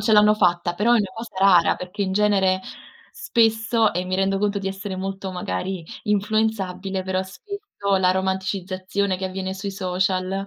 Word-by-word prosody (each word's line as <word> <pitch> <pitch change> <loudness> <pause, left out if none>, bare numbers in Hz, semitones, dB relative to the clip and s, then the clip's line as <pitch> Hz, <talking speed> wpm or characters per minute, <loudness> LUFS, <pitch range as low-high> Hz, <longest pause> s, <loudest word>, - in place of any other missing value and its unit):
ce 220 - +1
l'hanno 210 0 +6
fatta, 175 -3 +1
però 225 +6 +2
è - - +5
una 200 -3 -1
cosa 225 -2 -8
rara, 190 -3 +5
perché 180 +3 -5
in 190 -1 -1
genere, 195 -2 +3 0.5
spesso 225 -1 +2
e 180 +1 -2
mi 185 0 -2
rendo 195 0 +1
conto 205 0 0
di 195 -1 -3
essere 195 0 -5
molto 195 0 -4
magari 180 0 -4 0.2
influenzabile, 205 -2 0
però 185 0 -1
spesso, 400 - -9 0.4
la 185 -1 +3
romanticizzazione 190 0 -1
che 190 - -2
avviene 190 0 -4
sui 195 +1 -5
social, 185 0 -1
195 Hz, 165 wpm, -23 LUFS, 185-210 Hz, 0.5 s, l'hanno